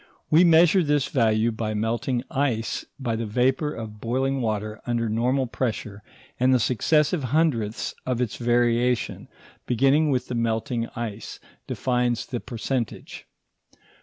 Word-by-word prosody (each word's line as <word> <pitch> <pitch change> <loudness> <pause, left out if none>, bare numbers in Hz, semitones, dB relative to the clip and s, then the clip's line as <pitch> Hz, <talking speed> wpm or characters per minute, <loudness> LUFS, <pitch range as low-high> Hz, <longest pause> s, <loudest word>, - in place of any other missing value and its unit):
We 160 +3 +7
measure 170 +2 +6
this 145 -3 +1
value 115 -2 +2
by 110 -1 -3
melting 115 +3 -1
ice 130 -6 -1
and - - -21
by 115 -2 0
the 115 0 -3
vapour 130 +7 +1
of 110 -5 -8
boiling 135 +3 0
water 110 -1 -3
under 120 -1 0
normal 125 +5 +1
pressure, 110 -3 -3 0.4
and 130 +1 +4
the 130 - +4
successive 150 - +2
hundredths 125 -6 0
of 125 -2 -2
its 120 -3 -2
variation, 120 0 +1 0.4
beginning 135 +5 +3
with 130 -3 0
the - - -4
melting 115 0 -1
ice, 115 -2 -6 0.3
defines 125 -2 0
the 125 -3 -4
percentage. 120 0 -4
120 Hz, 135 wpm, -24 LUFS, 115-135 Hz, 0.4 s, We